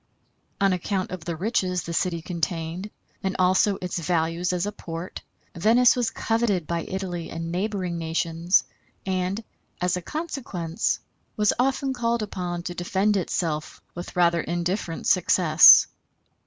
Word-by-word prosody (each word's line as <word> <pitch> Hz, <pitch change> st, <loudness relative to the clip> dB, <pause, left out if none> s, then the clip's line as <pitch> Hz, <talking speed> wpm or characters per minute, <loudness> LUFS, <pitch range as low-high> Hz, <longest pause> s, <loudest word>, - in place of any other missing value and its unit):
On 195 Hz, -1 st, +3 dB
account 185 Hz, +1 st, -2 dB
of 185 Hz, -3 st, -7 dB
the 170 Hz, -, -3 dB
riches 180 Hz, -1 st, -1 dB
the 170 Hz, -, -5 dB
city 170 Hz, -1 st, -1 dB
contained, 170 Hz, +2 st, -3 dB, 0.3 s
and 190 Hz, -1 st, -2 dB
also 185 Hz, +2 st, +3 dB
its 180 Hz, -1 st, -2 dB
values 165 Hz, +1 st, 0 dB
as 180 Hz, +1 st, -1 dB
a 205 Hz, -, -2 dB
port, 165 Hz, -2 st, -7 dB, 0.3 s
Venice 230 Hz, +8 st, +5 dB
was 245 Hz, -2 st, 0 dB
coveted 225 Hz, -7 st, 0 dB
by 170 Hz, +1 st, -2 dB
Italy 180 Hz, -3 st, -4 dB
and 165 Hz, 0 st, -5 dB
neighboring 185 Hz, -2 st, -2 dB
nations, 165 Hz, +2 st, +1 dB, 0.4 s
and, 190 Hz, +3 st, -1 dB, 0.4 s
as 180 Hz, 0 st, +1 dB
a -, -, -4 dB
consequence, 205 Hz, -, -3 dB, 0.4 s
was 210 Hz, -1 st, +3 dB
often 265 Hz, +1 st, +1 dB
called 235 Hz, -2 st, 0 dB
upon 175 Hz, -4 st, -4 dB
to 175 Hz, -, -4 dB
defend 190 Hz, +4 st, 0 dB
itself 165 Hz, -4 st, -2 dB
with 175 Hz, +1 st, -8 dB
rather 170 Hz, -1 st, +3 dB
indifferent 175 Hz, +1 st, -3 dB
success. 175 Hz, -2 st, +7 dB
180 Hz, 140 wpm, -25 LUFS, 170-200 Hz, 0.4 s, success